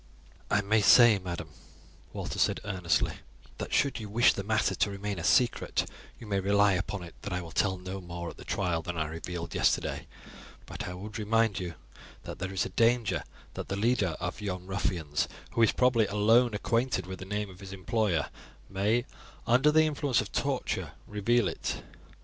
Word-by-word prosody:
"I 105 - +3
may 105 +2 +2
say, 110 +1 +7
madam," 85 -3 -5 0.6
Walter - - -5
said - - +2
earnestly, 90 -5 0 0.4
"that - - -5
should 140 -2 +2
you 105 -2 -7
wish 120 +4 +5
the - - -3
matter 110 +2 +1
to - - +1
remain 100 -1 -4
a - - -5
secret, 120 +7 +2 0.3
you - - -10
may 100 -2 0
rely 100 +1 +4
upon 95 +1 -2
it 85 - -10
that 100 - -6
I 90 - -1
will 85 -2 -8
tell 95 +1 +1
no 95 +1 -6
more 85 -1 -6
at - - -16
the - - -10
trial 85 -2 -1
than 85 +1 -5
I 80 - 0
revealed 85 +2 -5
yesterday; - - 0 0.6
but - - -6
I 90 - -5
would 105 +4 -7
remind 110 -1 +2
you 90 -3 -5 0.5
that - - -7
there 95 +1 -3
is 95 - 0
a - - -4
danger 115 -4 +2 0.3
that - - -6
the 100 - -2
leader 100 -5 +1
of 90 +4 -4
yon 90 -3 -4
ruffians, 90 -6 -1 0.2
who 115 - 0
is 115 - +6
probably 125 -4 +3
alone 110 +3 +3
acquainted 115 +3 0
with 95 0 -7
the 95 - -7
name 105 0 -3
of 90 - -15
his 95 -1 -9
employer, 95 - 0 0.4
may, 105 +5 +1 0.4
under 130 +6 +4
the 155 +1 +5
influence 145 -4 +1
of - - -3
the - - 0
torture, - - -2
reveal 105 +1 +1
it." 80 - -4
100 Hz, 190 wpm, -29 LUFS, 90-110 Hz, 0.6 s, say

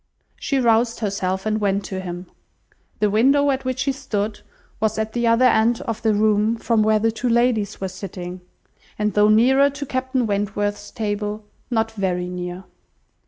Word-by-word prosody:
She 275 - -1
roused 230 -1 +2
herself 190 -2 -2
and 215 0 0
went 200 0 0
to 190 -2 -4
him. 180 -1 -6 0.7
The 210 -1 +1
window 275 +6 +4
at 265 0 -2
which 255 0 -1
he 275 - +1
stood 220 -6 -3 0.4
was 220 0 0
at 220 0 -2
the 235 -1 0
other 230 +2 +4
end 230 0 +3
of 225 -2 -4
the 220 -2 +2
room 215 +1 +2
from 225 -1 +1
where 215 0 +3
the 225 +1 +1
two 240 +3 -2
ladies 230 -3 +1
were 195 - -2
sitting, 185 -1 -7 0.6
and 210 -1 0
though 210 0 +4
nearer 265 +6 +5
to 285 +1 -6
Captain 260 -1 -1
Wentworth's 205 0 -2
table, 210 0 -3 0.2
not 225 -2 0
very 185 -4 -2
near. 180 +1 -6
215 Hz, 170 wpm, -22 LUFS, 205-235 Hz, 0.7 s, nearer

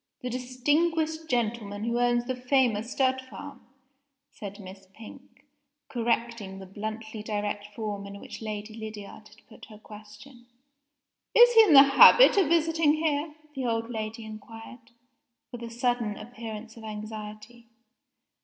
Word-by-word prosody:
"The 250 -1 -4
distinguished 310 +6 -1
gentleman 215 -4 -2
who 235 +1 -1
owns 240 0 +2
the 255 +1 -3
famous 250 -3 +1
stud 260 -1 +1
farm," 280 +2 -11 0.7
said 205 0 -9
Miss 190 0 -12
Pink, 255 +7 -15 0.4
correcting 230 -4 -2
the 190 - -9
bluntly 220 +3 -7
direct 205 -1 -3
form 205 -3 -5
in 200 0 -9
which - - -10
Lady 215 0 -6
Lydiard 215 -1 -9
had 215 +1 -21
put 220 - -14
her 215 - -14
question. 215 +4 -14 0.9
"Is 485 +1 +8
he 450 - +9
in 350 - +4
the 275 -1 +11
habit 285 - +8
of 390 -6 +3
visiting 325 -1 +2
here?" 305 -1 -1 0.2
the 265 -3 -3
old 230 0 -2
lady 220 0 -5
inquired, 225 +2 -11 0.6
with 245 - -8
a 235 - -6
sudden 235 -2 -1
appearance 225 -1 -9
of 225 - -12
anxiety. 215 +2 -9
230 Hz, 140 wpm, -27 LUFS, 215-260 Hz, 0.9 s, the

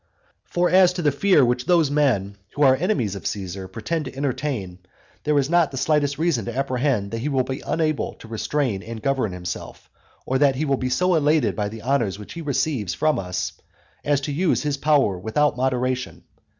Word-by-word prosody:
XVIII. - - -41
For 175 0 +2
as 185 -1 +6
to 180 -1 -4
the 145 - +3
fear 150 -1 +4
which 125 +2 -1
those 170 -5 +3
men, 120 -10 +1 0.2
who 145 - +2
are 130 -2 +6
enemies 135 - 0
of 100 -4 -5
Caesar, 95 -1 -5
pretend 150 - -3
to 130 - -8
entertain, 130 -9 -3 0.5
there 150 -1 +2
is 135 -1 +2
not 170 -1 +3
the 135 - -7
slightest 145 0 +1
reason 160 -7 +1
to 120 +1 -5
apprehend 130 -6 0
that 115 - -3
he 140 +6 -2
will 135 -3 +1
be 130 +2 -5
unable 155 -2 -1
to - - -14
restrain 115 -1 -1
and 110 +1 -8
govern 135 -7 0
himself, 90 -1 -7 0.3
or 130 0 0
that 140 -2 +4
he 150 +4 -1
will 140 -2 +1
be 130 - -2
so 180 +8 +2
elated 150 -5 +2
by 105 -1 -1
the 110 0 -9
honours 120 -7 0
which 105 - -10
he 170 - -6
receives 135 - -1
from 155 0 +1
us 90 -1 -3 0.5
as 145 -1 +2
to 145 - -3
use 170 +4 +1
his 145 -1 0
power 140 -10 +2
with 110 +4 -6
out 150 0 +3
moderation. 130 0 -1
135 Hz, 210 wpm, -23 LUFS, 115-150 Hz, 0.5 s, as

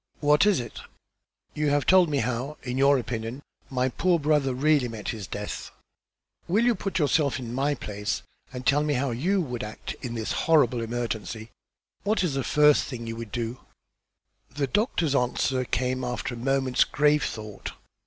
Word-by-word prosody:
"What 150 +5 +4
is 205 -7 +4
it?" 120 -2 -7 0.7
"You 150 -1 0
have 145 0 +1
told 185 -3 +6
me 145 -2 +1
how, 125 +5 -3
in 125 -1 -3
your 140 +1 +5
opinion, 120 +2 -4 0.3
my 130 -1 +1
poor 175 +7 +2
brother 145 -2 +2
really 145 -1 +3
met 110 -4 -6
his 105 -5 -5
death. - - -5 0.8
Will 210 +7 +2
you 245 - +4
put 195 -2 -3
yourself 150 -3 +2
in 120 -2 -6
my 140 +3 +1
place, 105 -4 -4 0.3
and 125 0 -7
tell 145 +2 +4
me 150 -1 0
how 130 +1 0
you 180 +12 +1
would 125 -7 -4
act 105 +1 -6
in 120 -2 -4
this 110 -1 -3 0.2
horrible 130 -7 +4
emergency? 115 -1 -4 0.5
What 210 0 +1
is 170 -6 0
the 135 -1 -1
first 150 -1 +4
thing 120 -4 -6
you 115 0 -4
would 115 -2 -7
do?" 120 +1 -3 0.9
The 140 +3 -1
doctor's 165 - 0
answer 130 0 +1
came 130 +1 -1
after 125 0 -3
a - - -6
moment's 130 +1 +2
grave 150 0 +2
thought. 110 -2 -5
130 Hz, 175 wpm, -26 LUFS, 120-150 Hz, 0.9 s, told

